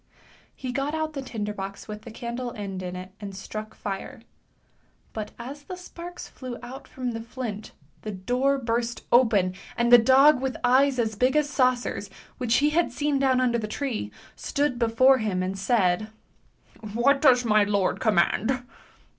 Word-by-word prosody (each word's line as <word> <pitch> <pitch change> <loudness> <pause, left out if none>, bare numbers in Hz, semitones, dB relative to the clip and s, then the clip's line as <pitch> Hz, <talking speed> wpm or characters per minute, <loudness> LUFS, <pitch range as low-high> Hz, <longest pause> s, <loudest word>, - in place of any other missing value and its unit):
He 255 -2 -5
got 275 +4 -1
out 315 -1 -2
the 275 - -4
tinder 210 -5 -4
box 195 0 -7
with 210 -1 -7
the 230 - -10
candle 240 +2 -5
end 195 -3 -5
in 180 0 -5
it 185 +1 -8
and 200 -2 -7
struck 215 +3 -7
fire, 210 +5 -6 0.9
but 215 -1 -4
as 270 +5 -8
the 365 +6 -7
sparks 355 -1 -9
flew 255 -2 -8
out 260 +2 -9
from 255 -2 -4
the 225 -1 -5
flint 225 -3 -6 0.3
the 215 - -6
door 245 +8 0
burst 235 -1 -2
open 215 -7 +4 0.2
and 235 0 +2
the 245 - +11
dog 265 +4 +6
with 265 -1 -2
eyes 260 +2 +4
as 225 -2 0
big 250 +6 +1
as 300 -1 +2
saucers, 255 -6 +1 0.3
which 245 -2 +1
he 295 +3 +3
had 335 +2 +2
seen 290 -1 0
down 265 -2 +3
under 240 -2 +2
the 215 - -3
tree, 220 - -3 0.2
stood 280 -4 -1
before 255 +3 +4
him 195 -4 -1
and 190 +1 -3
said, 195 -2 +2 0.4
" 215 -2 -14
What 275 +4 +3
does 250 -4 +5
my 215 -2 +4
lord 200 -2 0
command? 220 +5 +1
240 Hz, 175 wpm, -26 LUFS, 210-265 Hz, 0.9 s, the